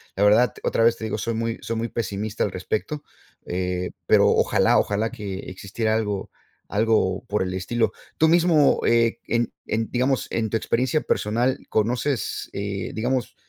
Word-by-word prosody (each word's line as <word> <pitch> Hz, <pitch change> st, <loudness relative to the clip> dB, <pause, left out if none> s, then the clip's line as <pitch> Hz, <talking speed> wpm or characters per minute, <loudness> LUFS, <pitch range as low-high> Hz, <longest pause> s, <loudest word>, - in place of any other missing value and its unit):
La 100 Hz, -, +1 dB
verdad 110 Hz, +3 st, +5 dB
otra 115 Hz, -, +1 dB
vez 115 Hz, 0 st, +4 dB
te 110 Hz, -, -5 dB
digo 110 Hz, -, -2 dB
soy 115 Hz, +2 st, -2 dB
muy 115 Hz, 0 st, -2 dB
soy 115 Hz, -, -3 dB
muy 115 Hz, +1 st, -1 dB
pesimista 105 Hz, -1 st, -2 dB
al 100 Hz, -, -1 dB
respecto. 110 Hz, +11 st, -3 dB, 0.4 s
Eh, 90 Hz, 0 st, -2 dB
pero -, -, +5 dB
ojalá -, -, +3 dB
ojalá 105 Hz, +2 st, 0 dB
que 100 Hz, -6 st, -5 dB
existiera 110 Hz, +4 st, -2 dB
algo, 105 Hz, -3 st, -2 dB, 0.4 s
algo 105 Hz, -3 st, +1 dB
por 105 Hz, -, 0 dB
el 90 Hz, 0 st, -3 dB
estilo. 105 Hz, +6 st, 0 dB, 0.2 s
Tú 160 Hz, -, +4 dB
mismo 165 Hz, -3 st, +4 dB
eh, 115 Hz, 0 st, +3 dB
en 120 Hz, 0 st, 0 dB
en 110 Hz, 0 st, -1 dB
digamos 130 Hz, +1 st, +1 dB
en 110 Hz, -2 st, -1 dB
tu 115 Hz, -, +1 dB
experiencia 130 Hz, +7 st, +1 dB
personal 120 Hz, +5 st, 0 dB
¿conoces, 120 Hz, +3 st, -1 dB
eh, 100 Hz, 0 st, -3 dB
digamos, 125 Hz, +2 st, -1 dB
110 Hz, 165 wpm, -24 LUFS, 105-120 Hz, 0.4 s, verdad